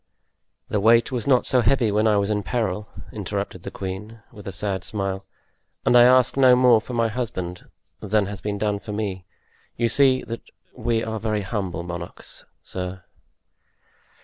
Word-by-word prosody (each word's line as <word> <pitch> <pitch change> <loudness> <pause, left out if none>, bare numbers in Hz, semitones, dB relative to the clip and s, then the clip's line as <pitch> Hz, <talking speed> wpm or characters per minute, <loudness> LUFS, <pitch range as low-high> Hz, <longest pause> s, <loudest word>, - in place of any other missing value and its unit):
"The 105 - 0
weight 115 +4 +4
was 125 -2 -3
not 130 -3 +4
so 125 - +3
heavy 120 -1 +2
when 105 +2 +2
I 105 -1 +4
was 100 +1 0
in 105 -1 0
peril," 105 -3 -2 0.2
interrupted - - -4
the - - -6
queen, 100 +4 -7
with 105 -1 -12
a - - -3
sad 95 -1 -3
smile, 95 -2 -3 0.6
"and - - +4
I 120 - +9
ask 130 0 +5
no 130 -2 +6
more 125 -3 +5
for 125 - -8
my 115 -1 +2
husband 95 -7 -5 0.3
than 105 0 +1
has 100 0 -7
been 105 -1 -3
done 105 0 -1
for 105 - -7
me; 100 -4 -3 0.5
you 120 - +2
see 130 +1 +4
that 115 0 -6 0.3
we 115 -1 0
are 110 0 -3
very 105 -1 -1
humble 95 -5 -3
monarchs, 85 0 -8 0.2
sir." 90 0 -6
105 Hz, 175 wpm, -23 LUFS, 95-115 Hz, 0.6 s, I